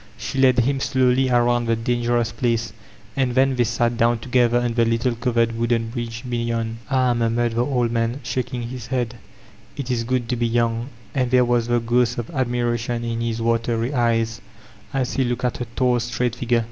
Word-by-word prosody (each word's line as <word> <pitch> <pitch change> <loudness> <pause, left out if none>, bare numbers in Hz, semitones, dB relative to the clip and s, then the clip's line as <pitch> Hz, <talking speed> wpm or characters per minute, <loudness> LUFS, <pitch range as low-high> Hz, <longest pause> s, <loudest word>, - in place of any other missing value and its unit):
She 135 - -4
led 130 -2 +5
him 135 +3 0
slowly 130 0 +2
around 120 -1 +2
the 115 - +2
dangerous 120 0 0
place, 115 -2 -1 0.4
and 130 -3 0
then 135 0 +3
they 125 - +3
sat 120 0 0
down 120 +1 +3
together 120 0 +2
on 120 -1 -1
the 115 0 +3
little 115 +2 +1
covered 115 -1 0
wooden 115 0 0
bridge 115 -1 -5
beyond 115 -1 -2
''Ah 130 -2 +2
t^ - - -2
murmured 120 0 +1
the 115 +2 +1
old 125 -3 0
man, 115 +2 -1
shaking 125 0 -3
his 120 -1 -6
head, 120 -2 -2 0.6
"it 135 -2 -3
is 115 -2 0
good 125 0 -1
to 125 - +1
be 120 0 0
young/* 115 +1 0 0.2
And 130 -2 0
there 125 0 +4
was 120 -1 +1
the 120 0 +2
ghost 120 +1 +1
of 120 +3 -4
ad 130 -5 0
miration 120 -1 -1
in 115 0 -2
his 115 -1 -2
watery 115 +2 0
eyes, 115 -2 +1 0.5
as 135 -3 -1
he 135 - +1
k>oked 125 0 -2
at 125 - -1
her 120 - -4
tall 125 -2 +2
straight 120 0 -1
figure. 120 -1 +1
120 Hz, 200 wpm, -22 LUFS, 115-125 Hz, 0.6 s, led